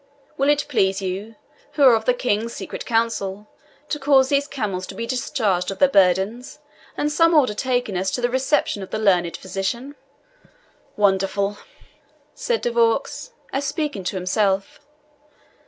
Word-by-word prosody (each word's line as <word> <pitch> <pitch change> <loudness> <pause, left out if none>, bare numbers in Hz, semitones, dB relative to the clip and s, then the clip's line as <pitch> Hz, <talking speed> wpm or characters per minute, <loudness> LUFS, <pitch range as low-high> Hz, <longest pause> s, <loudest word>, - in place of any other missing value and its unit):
Will 275 +1 +1
it 295 0 +2
please 195 -8 +1
you, 195 +4 -5 0.4
who 290 - +1
are 260 -3 +8
of 220 -1 +1
the 250 - +4
King's 230 -1 -1
secret - - -7
council, 215 -3 -1 0.4
to 295 - -2
cause 270 -2 +4
these 280 0 +1
camels 200 -10 -3
to 195 - -9
be 230 - -4
discharged 215 -7 -1
of 195 - -5
their 280 - +5
burdens, 195 +5 +1 0.4
and 295 - 0
some 330 +2 +4
order 260 -8 +4
taken 245 -3 -1
as 190 +1 0
to 215 - -3
the 245 - +1
reception 260 -4 0
of 190 - -7
the - - -3
learned 180 -5 +2
physician?" 195 +9 -4 1.0
"Wonderful!" 200 0 +1 0.7
said 485 -1 -2
De 240 - -1
Vaux, 235 - 0 0.2
as 275 +1 -1
speaking 295 - -3
to 190 - -2
himself. 195 +1 0
225 Hz, 155 wpm, -22 LUFS, 195-270 Hz, 1.0 s, are